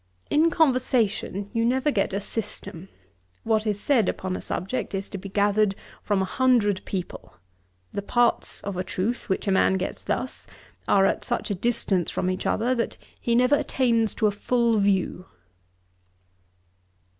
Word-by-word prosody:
In 315 +3 +4
conversation 245 - +1
you 230 -1 +1
never 260 +5 +2
get 200 -7 0
a 195 - -1
system. 195 -4 -5 0.5
What 220 -1 +1
is 205 -1 0
said 230 -4 +2
upon 185 -1 -3
a - - -5
subject 200 +1 -3
is 195 +1 -3
to 195 - -6
be 195 +1 -8
gathered 205 0 +2 0.3
from 200 -2 +1
a - - -1
hundred 215 -3 +2
people. 185 -3 -6 0.6
The 200 - -2
parts 240 +3 +1
of 200 -2 -5
a 185 - -1
truth, 210 +7 -3
which 190 - -1
a - - +3
man 190 0 +3
gets 190 - -3
thus, - - -4 0.4
are 195 -1 +4
at - - 0
such 240 -3 -2
a - - +2
distance 195 -3 +1
from 185 - -1
each 185 - -3
other 240 +4 +1
that 235 -2 -2 0.2
he 235 - 0
never 250 +3 +4
attains 230 -6 +1
to 220 - 0
a 210 - +4
full 230 +2 +1
view.' 190 -2 0
210 Hz, 165 wpm, -25 LUFS, 195-240 Hz, 0.6 s, In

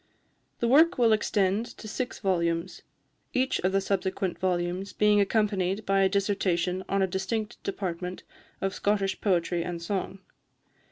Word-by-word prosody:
The 235 - +2
work 315 +8 +5
will 230 -3 +5
extend 210 +1 +1
to 215 - -9
six 245 +3 -4
volumes, 170 -2 -1 0.5
each 260 +1 +1
of 185 - +1
the 195 - +2
subsequent 190 -1 -1
volumes 180 +1 -1
being 210 -1 +4
accompanied 200 -1 0
by 195 0 +3
a 190 - +4
dissertation 190 -2 0
on 195 0 +2
a - - +4
distinct 190 +4 -3
department 180 -2 -4 0.4
of 195 0 -1
Scottish 200 -2 0
poetry 175 -3 +1
and 175 0 -4
song. 190 +2 -3
195 Hz, 145 wpm, -27 LUFS, 180-210 Hz, 0.5 s, work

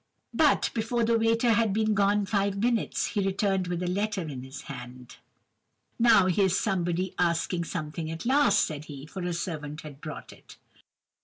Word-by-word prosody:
"But, - - +3
before 230 +1 0
the 230 +1 +3
waiter 230 +1 +3
had 225 -2 +2
been 215 0 +1
gone 205 0 +2
five 200 -1 0
minutes, 235 +2 0
he 205 -3 -1
returned 195 -1 0
with 175 0 -2
a - - -2
letter 200 +1 -1
in 135 -4 -6
his 130 +2 -9
hand. 125 -2 -10 0.8
"'Now, 230 -5 +6
here's 190 0 +2
somebody 180 -1 -1
asking 170 0 0
something 155 -1 -4
at 165 +4 -6
last,' 280 +3 +4
said 150 -1 -6
he, 140 -2 -9
for 185 +5 -7
a 175 0 -2
servant 155 -3 -4
had 145 -2 -11
brought - - -8
it. - - -16
185 Hz, 170 wpm, -27 LUFS, 160-210 Hz, 0.8 s, Now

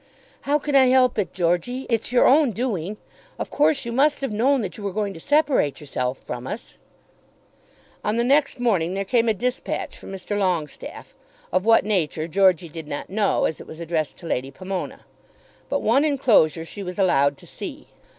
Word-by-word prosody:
"How 295 - +4
can 295 -1 -4
I 265 -1 +7
help 255 -2 +4
it, 200 - -1
Georgey? 180 +9 -1
It's 230 -1 -1
your 250 - +4
own 275 -3 +4
doing. 210 -4 -3 0.4
Of - - -5
course 290 -2 +2
you 235 - -3
must 285 +5 +2
have 270 - -2
known 260 +5 +2
that 195 -4 -5
you 210 - -9
were 200 - -2
going 205 -1 -2
to 165 - -10
separate 280 - +2
yourself 130 -3 -3
from - - -7
us." - - -7 1.2
On 210 +2 0
the 235 - +2
next 275 +1 +2
morning 190 -7 +1
there 195 0 -2
came 230 +3 +2
a - - +3
dispatch 250 +5 -3
from - - -11
Mr. 195 +2 -4
Longestaffe, 180 -7 -3 0.4
of 185 +2 +1
what 225 -2 +5
nature 165 -6 0
Georgey 185 -1 +3
did 160 -1 -9
not 145 +4 -6
know 205 0 +1
as 160 - -2
it - - -12
was 160 - -10
addressed 165 -3 -2
to - - -13
Lady 135 -4 -2
Pomona. 185 +6 -6 0.6
But 280 - -1
one 245 +6 +4
enclosure 230 - +3
she 200 - -7
was 180 0 -6
allowed 140 -7 +3
to - - -14
see. - - -8
200 Hz, 190 wpm, -23 LUFS, 170-250 Hz, 1.2 s, I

